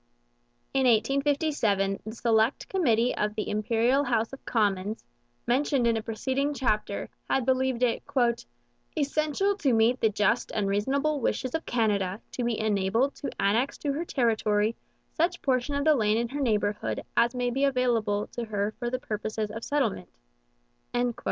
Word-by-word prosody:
In 265 -1 +3
1857 240 -4 +1
the 220 +2 -7
select 225 +2 +1
committee 245 - +2
of 210 0 -1
the 215 - -3
Imperial 230 +6 +2
House 230 -2 0
of 270 - -9
Commons, 205 -1 0 0.4
mentioned 260 +1 +1
in 230 -1 +3
a 225 - -1
preceding 265 +6 -2
chapter, 215 -6 -1 0.2
had 265 -3 +1
believed 260 -1 +1
it 240 -2 +1 1.0
'essential 305 +7 +1
to 280 -10 +1
meet 230 +3 +3
the 220 - +4
just 210 +3 +1
and 205 -2 0
reasonable 275 +9 0
wishes 255 +2 -1
of 320 - -3
Canada 205 -5 0
to 250 - -3
be 235 -2 -1
enabled 220 +5 +1
to 285 - -4
annex 225 +7 +1
to 285 -2 -2
her 310 +4 -2
territory 220 -6 +1 0.4
such 345 +2 0
portion 260 +1 0
of 280 +1 -1
the 310 - +6
land 215 -5 +2
in 235 0 -1
her 285 +3 -4
neighbourhood 210 -4 0
as 235 +2 +3
may 245 0 0
be 270 +3 -1
available 235 -6 +1
to 240 - -4
her 210 -1 -2
for 240 -1 -2
the 255 - -1
purposes 215 -2 -4
of 225 +1 -7
settlement.' 230 - -1
235 Hz, 160 wpm, -27 LUFS, 215-270 Hz, 1.0 s, the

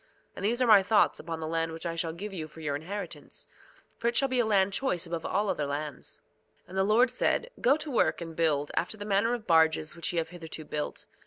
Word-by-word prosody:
And - - -7
these 240 +5 +2
are - - +3
my 215 -4 +8
thoughts 205 +2 +3
upon 165 0 -5
the 155 - -3
land 165 0 -1
which 165 +2 -7
I 170 - -1
shall 165 -1 -1
give 195 +5 -7
you 160 -4 -4
for 155 +1 -14
your 150 -3 -2
inheritance; 195 +8 -6 0.5
for 235 - -1
it 235 - +1
shall 275 - +4
be 255 -1 0
a 240 - +3
land 200 -2 +3
choice 185 -8 0
above 165 -1 -4
all 205 +3 0
other 150 -6 -1
lands. 145 +1 -5 0.4
2:16 - - -28
And 190 - -7
the - - +4
Lord 230 +5 +4
said: 480 - 0
Go 275 +4 +4
to 305 -1 -5
work 240 - +2
and 165 -2 -7
build, 150 -3 +1
after 215 - -1
the 205 - -6
manner 210 +4 +2
of 225 -3 -9
barges 160 -1 +3
which 170 - -2
ye 175 - -4
have 165 -1 0
hitherto 160 -2 -7
built. 150 0 -4
175 Hz, 250 wpm, -29 LUFS, 160-215 Hz, 0.5 s, my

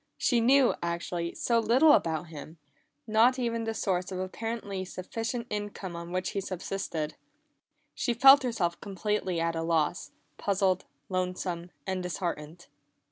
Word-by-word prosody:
She 240 -3 +2
knew, 260 +2 +5
actually, 170 0 -3
so 235 -1 +2
little 250 +8 +5
about 165 - +2
him 155 +1 -9 0.5
not 225 +4 +4
even 230 -2 -1
the 225 - -1
source 185 -3 -1
of 185 - -3
the 185 - -1
apparently 205 -1 -4
sufficient 225 +6 -4
income 205 -3 -4
on 170 0 -7
which 185 0 -1
he 200 - -2
subsisted. 185 -4 -4 0.8
She 240 - -1
felt 270 +4 +8
herself 190 -9 -1
completely 195 -2 -2
at 165 0 0
a 165 - -1
loss, 165 -2 0 0.3
puzzled, 190 -2 +1 0.2
lonesome, 180 -1 -2 0.2
and 190 -1 -2
disheartened. 175 -2 -4
190 Hz, 140 wpm, -29 LUFS, 170-225 Hz, 0.8 s, felt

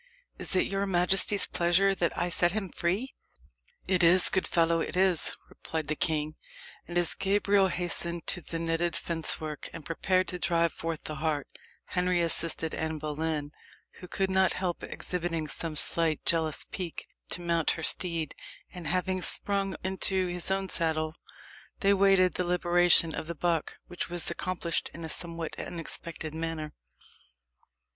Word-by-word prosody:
"Is - - 0
it 185 - +3
your 195 0 -2
majesty's 190 +2 +6
pleasure 180 +3 +2
that 175 -3 -1
I 175 - 0
set 175 0 +3
him 205 -3 -2
free? 195 +12 -2 0.7
"It 185 -1 +2
is, 175 +2 +7
good 190 - 0
fellow 165 -1 +2
it - - -4
is," 185 -4 +2
replied 160 -2 -5
the 155 - +1
king. 155 -1 -1 0.5
And 175 - -3
as 175 -2 +2
Gabriel 200 0 +2
hastened 175 -1 -2
to 175 - +2
the 165 - -5
netted 165 0 -1
fencework, 160 -2 -3
and 165 - -9
prepared 185 +2 +1
to 180 - -5
drive 170 -1 +1
forth 165 -1 -5
the 155 - -5
hart, 150 -1 -1 0.4
Henry 180 -1 +1
assisted 165 -1 +2
Anne 160 0 -3
Boleyn, 150 0 -3 0.5
who 180 - -10
could 190 +2 -1
not 190 -1 +3
help 180 -2 -3
exhibiting 170 -3 -3
some 160 +1 -2
slight 160 0 +1
jealous 160 -2 +1
pique, 180 -4 -5 0.2
to 180 - -1
mount 170 -2 +1
her 160 - -6
steed, 165 -3 0 0.4
and 175 -3 -7
having 185 +3 0
sprung 195 +2 0
into 190 0 0
his 180 0 -2
own 195 0 0
saddle, 160 -3 -1 0.7
they 200 0 +4
waited 195 -2 +4
the 180 - -1
liberation 175 -2 +3
of 155 - -5
the 170 - -5
buck, 165 0 -1
which 175 - -5
was 175 -1 -1
accomplished 175 -2 -2
in 165 0 -7
a - - -6
somewhat 165 -1 -2
unexpected 165 -2 -5
manner. 160 -1 -4
170 Hz, 155 wpm, -29 LUFS, 160-185 Hz, 0.7 s, is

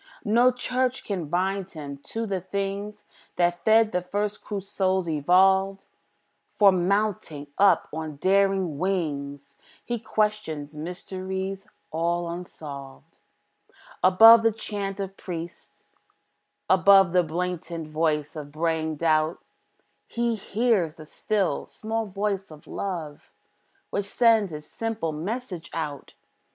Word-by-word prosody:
No 235 +4 +5
church 250 +1 -1
can 185 -6 -3
bind 190 +3 -1
him 145 -4 -8
to 225 0 -3
the 195 -3 -2
things 200 +2 -4 0.3
That 175 0 +1
fed 220 0 +5
the 180 - 0
first 205 +3 -3
crude 200 -2 -5
souls, 190 -2 0
evolved; 190 +5 +3 0.7
For, 200 -2 +7
mounting 185 -5 0
up 200 0 +5
on 155 -1 -5
daring 190 -2 +2
wings, 145 -7 -3 0.3
He 240 -1 -2
questions 210 -10 -2
mysteries 190 +4 -5 0.2
all 170 +2 0
unsolved. 145 -6 -9 0.8
Above 225 +5 +9
the 225 0 +3
chant 205 -2 -5
of 195 -1 -4
priests, 170 -1 -8 0.8
above 190 -1 +6
The 180 0 +4
blatant 170 -1 -4
voice 155 -1 -1
of 145 -2 -7
braying 160 0 -1
doubt, 155 +1 +2 0.7
He 235 0 0
hears 210 -6 0
the 155 - -11
still, 200 +4 -1
small 225 0 -3
voice 195 0 -2
of 155 -2 -14
Love, 165 -7 -5 0.6
Which 200 - -1
sends 225 -3 +3
its 150 -1 -7
simple 225 -4 -3
message 180 +2 -5
out. 150 -3 -5
185 Hz, 120 wpm, -26 LUFS, 160-205 Hz, 0.8 s, Above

